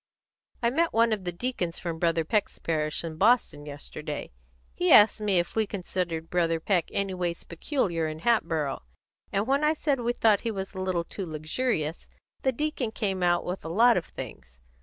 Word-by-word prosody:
"I 235 - +3
met 330 +5 +1
one 230 0 +4
of 200 -4 -4
the 175 - -1
deacons 175 -3 -3
from 165 -2 -4
Brother 165 -1 +1
Peck's 210 +4 0
last - - -27
parish, 155 -1 -1
in 160 -2 -6
Boston, 205 -8 +2
yesterday. 145 +1 -6 0.4
He 180 - +1
asked 215 +1 +7
me 205 -3 +2
if 175 0 0
we 220 -1 +2
considered 175 -4 -3
Brother 165 -2 +1
Peck 175 0 +1
anyways 180 -3 -2
peculiar 170 - -1
in 155 0 -6
Hatboro', 160 - +1 0.5
and 200 +2 0
when 275 +4 +1
I 305 +1 +4
said 290 -3 0
we 240 0 0
thought 215 -4 +3
he 230 - -2
was 195 -2 -4
a 190 - -6
little 185 -2 0
too 190 +2 -5
luxurious, 155 +1 -2 0.3
the 265 - +2
deacon 290 -3 -2
came 200 -4 -2
out 175 -1 +2
with 180 +2 -4
a 160 - -5
lot 230 +7 +5
of 175 - -1
things. 65 -1 -9
185 Hz, 190 wpm, -27 LUFS, 165-225 Hz, 0.5 s, asked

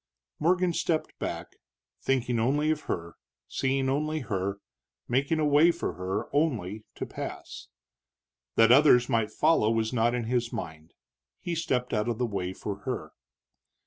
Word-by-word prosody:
Morgan 180 +2 +2
stepped 160 -1 -1
back, - - -5 0.4
thinking 125 -3 0
only 145 +6 +2
of 155 -1 -3
her, 85 -1 -4 0.3
seeing 135 0 0
only 155 +3 0
her, 100 -4 -2 0.5
making 140 +6 +1
a 155 - +1
way 150 +3 +6
for 170 0 -1
her, 95 +3 -3
only, 110 - 0
to - - -4
pass. - - -7 0.9
That 115 +1 +6
others 125 -2 +6
might 115 -2 +1
follow 150 -2 +3
was 115 +1 0
not 120 0 +2
in 120 - -1
his 120 0 -1
mind. 80 0 -7 0.4
He 175 - -4
stepped 130 -7 -1
out 105 +1 +1
of 115 - -1
the 125 - 0
way 95 -5 -3
for 100 +1 -5
her. 125 +5 -5
125 Hz, 150 wpm, -28 LUFS, 105-150 Hz, 0.9 s, way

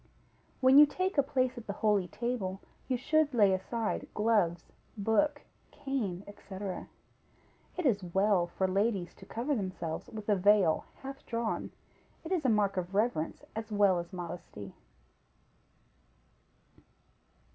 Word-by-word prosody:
When 260 +2 +8
you 300 - +9
take 370 +2 -1
a - - +8
place 255 -2 0
at 230 - -13
the 200 - -2
holy 205 -4 +3
table, 210 -4 -3 0.3
you 255 -2 +1
should 300 +1 +2
lay 205 -4 +5
aside 215 +4 -2
gloves, 205 -6 +2 0.3
book, 225 +9 +1 0.3
cane, 215 -10 -3
&c. 205 -1 -11 1.2
It 360 - -2
is 205 -7 +2
well 190 -2 +3
for 190 +2 -1
ladies 195 -1 0
to 190 - -15
cover 250 +6 -2
themselves 185 -6 -4
with 215 -3 -8
a 210 - +4
veil 195 -3 +4 0.2
half 270 +1 -7
drawn; 230 -1 -2 0.5
it 325 - -7
is 355 -5 +1
a 260 - +3
mark 205 -3 +2
of 185 +1 -3
reverence 210 -7 0
as 220 0 -5
well 200 -3 +4
as 170 0 -7
modesty. 175 - -7
210 Hz, 135 wpm, -31 LUFS, 190-250 Hz, 1.2 s, you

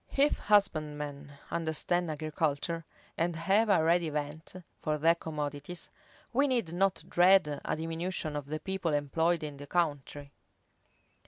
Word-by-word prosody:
If 285 +2 +3
husbandmen 150 -8 0 0.2
understand 170 +1 0
agriculture, 155 +1 -2 0.3
and 170 +1 +1
have 195 +7 +2
a 185 -5 +4
ready 170 0 +3
vent 150 +3 -5 0.3
for 155 0 0
their 165 +3 +5
commodities, 150 0 -5 0.4
we 280 +4 +3
need 235 -11 0
not 190 +2 +1
dread 175 -5 +4
a - - -1
diminution 165 0 -3
of 145 -2 -4
the 155 +1 -3
people 190 -4 -2
employed 160 +4 +1
in 145 -2 -5
the 145 0 -9
country. 145 -4 -2
160 Hz, 135 wpm, -31 LUFS, 150-175 Hz, 0.4 s, their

